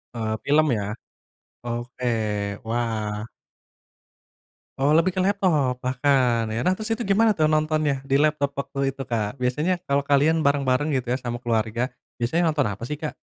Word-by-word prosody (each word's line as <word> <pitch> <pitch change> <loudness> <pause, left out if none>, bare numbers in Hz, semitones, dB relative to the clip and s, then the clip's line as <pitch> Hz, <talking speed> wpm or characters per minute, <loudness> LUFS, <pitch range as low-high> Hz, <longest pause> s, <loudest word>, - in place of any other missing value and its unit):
Eee, 110 -1 -1
film 155 +2 +3
ya? 105 -2 -2 0.7
Oke, 120 +1 -2 0.5
wah. 110 -2 -2 1.5
Oh, 140 +3 +3
lebih 165 +3 +4
ke 185 - -8
laptop 155 -11 +1
bahkan 125 -2 +2
ya. 115 - -1
Nah, 185 +5 +1
terus 220 +1 -2
itu 225 - -4
gimana 215 +1 +3
tuh 155 -5 +2
nontonnya, 155 -2 +1
di 135 - -2
laptop 150 -2 +1
waktu 135 0 -2
itu, 135 - -8
Kak? 110 -3 -1
Biasanya 150 +9 0
kalau 140 0 +1
kalian 150 +3 +3
bareng-bareng 140 +1 +2
gitu 130 -2 -1
ya, 125 - +1
sama 120 -2 -5
keluarga. 115 +1 0 0.3
Biasanya 160 +7 +2
nonton 150 - +1
apa 100 +3 -5
sih, 150 - -4
Kak? 155 - -2
135 Hz, 160 wpm, -24 LUFS, 120-155 Hz, 1.5 s, lebih